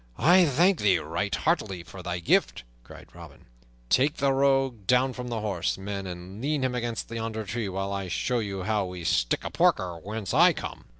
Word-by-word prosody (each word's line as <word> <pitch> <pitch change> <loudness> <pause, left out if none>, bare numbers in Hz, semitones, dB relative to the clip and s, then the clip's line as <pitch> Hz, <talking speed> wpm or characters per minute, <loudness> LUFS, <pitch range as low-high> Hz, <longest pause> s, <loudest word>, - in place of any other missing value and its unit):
"I 180 +3 +6
thank 170 +6 +3
thee 100 -4 +4
right 85 +6 -2
heartily 100 - -1
for 95 +2 -11
thy 90 -1 -3
gift," 85 -7 +1 0.2
cried - - -14
Robin. - - -13 0.4
"Take 140 - +3
the 140 -1 +2
rogue 135 -6 +1
down 125 +1 +3
from 125 0 -6
the 115 -2 -3
horse, 95 -5 -1
men, 100 0 -5
and 90 +3 -8
lean 145 0 -1
him 130 -1 0
against 120 -2 -4
yonder 110 -1 -4
tree, 110 0 -3
while 95 +1 -3
I 100 -1 -3
show 120 +7 -1
you 100 -4 -4
how 105 -1 0
we 90 -1 -7
stick - - +1
a - - -5
porker 90 -2 +1
whence 105 +2 -5
I - - +6
come!" - - -7
105 Hz, 195 wpm, -27 LUFS, 95-125 Hz, 0.4 s, I